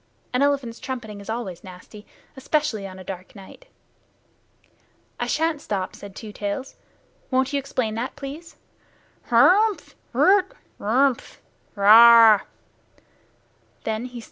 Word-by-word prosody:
An 250 - +1
elephant's 275 -5 0
trumpeting 240 -6 -7
is 200 - -12
always 220 -6 -5
nasty, 190 +3 -13 0.3
especially 265 -6 -2
on 185 -1 -11
a 185 - -10
dark 185 +1 -9
night. 200 - -14 1.5
"I - - -2
shan't 320 -2 -1
stop," 190 -3 -4
said 200 -1 -12
Two 215 -2 -9
Tails. 205 +7 -5 0.5
"Won't 260 +1 0
you 285 - +1
explain 255 -5 -3
that, 235 +4 -5
please? 290 +4 -9 0.7
Hhrrmph! 385 - +3 0.2
Rrrt! 385 0 +3 0.3
Rrrmph! 250 +5 0 0.4
Rrrhha!" 225 +1 +8
235 Hz, 110 wpm, -23 LUFS, 205-280 Hz, 1.5 s, Rrrhha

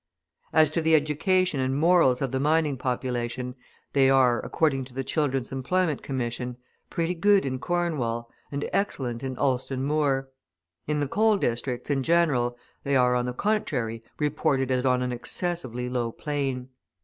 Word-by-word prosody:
As 155 -1 +4
to 165 - 0
the 160 0 +4
education 160 +2 +2
and 130 +1 0
morals 160 -6 +4
of 135 - -1
the 130 - 0
mining 150 0 +2
population, 125 -1 -2 0.4
they 135 -1 +5
are, 130 -3 +4
according 140 -5 +1
to 125 -1 -15
the 135 - -2
Children's 135 -4 -1
Employment 150 +4 0
Commission, 125 -1 -3 0.3
pretty 170 +1 -1
good 200 +2 +3
in 130 -1 -2
Cornwall, 140 -10 -1 0.2
and 140 0 -2
excellent 125 -12 -1
in 130 -1 -4
Alston 130 0 0
Moor; 140 -2 +1 0.6
in 150 0 0
the 145 - 0
coal 215 +7 +3
districts, 125 -2 -2
in 135 -1 +1
general, 135 -6 +2 0.3
they 140 0 0
are, 125 -1 +4
on 125 0 0
the - - -1
contrary, 125 - -1
reported 145 -3 0
as 130 +1 +1
on 125 0 +2
an 125 - -2
excessively 125 -1 -3
low 120 -2 -1
plane. 135 -2 -3
135 Hz, 160 wpm, -26 LUFS, 125-155 Hz, 0.6 s, they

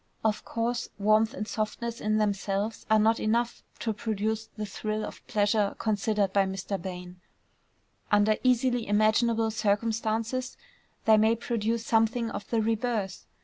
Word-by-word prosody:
Of 215 -1 +1
course 235 +1 -2
warmth 215 +4 +3
and 210 - -4
softness 230 +2 -3
in 215 0 +1
themselves 205 0 -1
are 220 - +6
not 220 +1 +3
enough 235 +2 0 0.2
to 225 - 0
produce 220 +1 -2
the 215 - -3
thrill 215 +1 -3
of - - -9
pleasure 205 -1 +1
considered 205 -2 0
by 195 -1 +3
Mr. 195 0 -4
Bain: 180 0 -7 0.9
under 210 +1 +4
easily 250 -2 +2
imaginable 220 +2 +3
circumstances 225 +3 -1 0.5
they 220 -1 +6
may 220 +2 +4
produce 230 0 -2
something 225 +1 +2
of - - -6
the 225 -2 +1
reverse. 220 -3 -1
220 Hz, 140 wpm, -28 LUFS, 205-230 Hz, 0.9 s, are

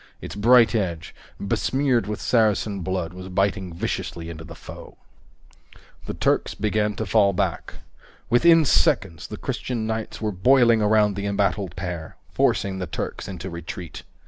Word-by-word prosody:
Its - - -7
bright 115 +3 +5
edge, 85 -7 -2 0.3
besmeared 125 +2 0
with 105 0 -4
Saracen 110 -3 +1
blood, 90 -2 -3
was 95 +1 -9
biting 95 0 0
viciously 85 0 -4
into 80 -1 -9
the 85 +1 -10
foe. - - -11 1.1
The - - -4
Turks - - 0
began 105 0 0
to 110 - -3
fall 100 -3 +3
back. - - -2 0.5
Within 165 +6 +5
seconds, 80 - +1
the - - -7
Christian 120 -4 -3
knights 110 0 -4
were 110 -1 -1
boiling 115 +3 +4
around 105 -1 +3
the 100 +1 -3
embattled 100 -2 -1
pair, 85 -3 -5 0.2
forcing 95 -1 +1
the 90 - -4
Turks - - -5
into 95 -1 -6
retreat. 85 0 -7
100 Hz, 145 wpm, -23 LUFS, 90-110 Hz, 1.1 s, bright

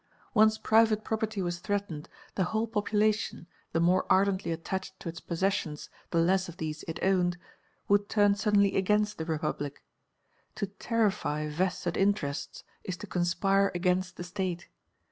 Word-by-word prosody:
Once 215 0 +5
private 220 -1 +3
property 215 -3 -2
was 175 0 -2
threatened, 185 -5 -3 0.2
the 190 - +1
whole 220 +5 0
population, 215 -2 0 0.3
the 165 - +1
more 180 +2 +3
ardently 190 -2 +3
attached 185 +3 -4
to - - -8
its 165 0 -5
possessions 170 -4 -2 0.2
the 170 - -1
less 185 +2 +3
of 175 - -10
these 155 -1 -4
it 165 - -4
owned, 180 -2 +2 0.5
would 205 0 +3
turn 205 -1 +4
suddenly 200 -1 +2
against 210 +1 +1
the 160 - -2
Republic. 150 -3 -3 0.7
To 205 - -1
terrify 200 -7 -1
vested 175 +2 -1
interests 160 -8 -1 0.2
is 185 -1 -4
to - - -7
conspire 195 +2 +2
against 180 +1 0
the - - -5
State. 180 -1 -4
190 Hz, 145 wpm, -29 LUFS, 170-205 Hz, 0.7 s, Once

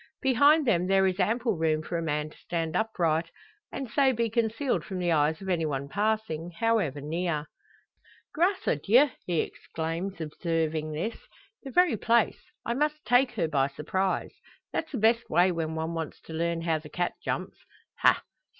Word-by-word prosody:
Behind 285 +4 +5
them 180 -6 +2
there 195 0 +4
is 185 0 0
ample 225 +3 +1
room 155 -1 +1
for 170 - -5
a 165 - 0
man 150 -1 -2
to - - -18
stand 165 -2 -3
upright, 170 -7 +1 0.4
and 270 - -4
so 270 +3 +3
be 230 -1 -1
concealed 235 +4 0
from 190 - -6
the 175 -1 0
eyes 155 +3 +2
of - - -7
anyone 155 -6 -1
passing, 205 -3 -1
however 215 -12 +1
near. 155 +1 -2 0.9
"Grace 365 +4 +1
a - - +2
Dieu!" 245 - +4 0.2
he 170 -3 +2
exclaims, 165 +4 -5
observing 160 -1 -2
this; 195 +10 -3 0.4
"the 275 - -8
very 345 -4 +3
place. 235 - +2 0.2
I 235 - 0
must 300 +3 -1
take 245 +1 +4
her 170 -7 0
by 140 -3 +2
surprise. 185 +7 -2 0.4
That's 320 - -2
the 270 - -3
best 230 +2 +2
way 180 +1 +4
when 160 -2 -3
one 160 +1 -2
wants 160 -2 -5
to 160 - -10
learn 170 +1 -1
how 165 -2 +1
the 150 0 -12
cat 175 +3 -1
jumps. - - -3 0.4
Ha! - - +4
180 Hz, 175 wpm, -28 LUFS, 160-230 Hz, 0.9 s, Behind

